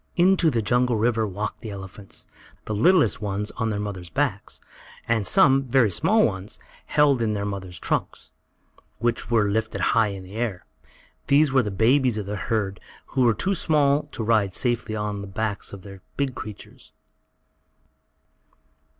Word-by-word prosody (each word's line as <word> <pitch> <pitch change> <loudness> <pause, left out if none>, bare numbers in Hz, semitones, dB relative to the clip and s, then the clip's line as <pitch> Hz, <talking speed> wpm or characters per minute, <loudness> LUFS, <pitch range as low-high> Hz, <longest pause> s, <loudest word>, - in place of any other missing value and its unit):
Into 180 -1 +4
the 115 -6 -1
jungle 120 +3 +2
river 110 0 +1
walked 105 +2 -5
the 110 - -7
elephants, 95 0 -9 0.4
the 110 - -3
littlest 120 - +3
ones 105 0 -2
on 115 -1 0
their 105 -2 -2
mothers' 95 -4 -5
backs, 80 - -2 0.5
and 115 -3 +1
some, 135 -8 +4
very 125 -4 +3
small 215 - +3
ones, 95 -1 -4 0.3
held 145 -4 +3
in 110 -2 0
their 100 -1 -2
mothers' 95 -4 -5
trunks, - - -3 0.7
which 120 0 -1
were 110 -3 +3
lifted 110 +1 -2
high 115 -2 +4
in 100 -2 -6
the 95 +2 -12
air. 115 -6 -3 0.6
These 145 0 +4
were 135 -1 +4
the 105 - -3
babies 120 +4 +2
of 105 - -3
the 105 +1 -4
herd 100 -2 -2 0.3
who 130 - -1
were 120 -3 +4
too 195 - 0
small 150 -4 +2
to 115 - -4
ride 105 -4 +1
safely 120 -3 -1
on 105 -1 -3
the 100 - -7
backs 105 +1 -3
of 100 -2 -10
the 95 -1 -11 0.2
big 140 -2 -1
creatures. 105 -4 -10
110 Hz, 165 wpm, -24 LUFS, 100-130 Hz, 0.7 s, Into